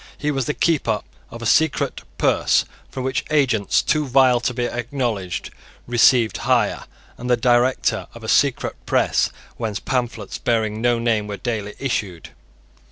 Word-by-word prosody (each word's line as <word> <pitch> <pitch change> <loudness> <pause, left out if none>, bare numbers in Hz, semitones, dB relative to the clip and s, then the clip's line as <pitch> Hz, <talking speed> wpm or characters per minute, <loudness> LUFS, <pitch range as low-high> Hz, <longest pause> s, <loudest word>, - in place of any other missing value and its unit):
He 150 - -1
was 135 -3 -1
the 150 - -2
keeper 135 -10 +1 0.3
of 115 0 -9
a - - -4
secret 160 +5 +2 0.2
purse - - +2 0.2
from 130 - -5
which 130 0 -1
agents 125 -8 +2
too 150 -1 +1
vile 130 -1 +4
to 125 - -1
be 120 0 -2
acknowledged 120 -7 -3 0.3
received 120 -1 +4
hire, - - +1 0.3
and 125 +1 -5
the 125 - +4
director 120 +2 +2
of - - -11
a - - -6
secret - - +2
press - - +2 0.3
whence 110 -3 -3
pamphlets, 120 -5 -3
bearing 110 -2 0
no 120 0 +2
name, 115 -3 0
were 100 -1 -5
daily 105 -4 -4
issued. 100 - -3
120 Hz, 155 wpm, -21 LUFS, 110-130 Hz, 0.3 s, vile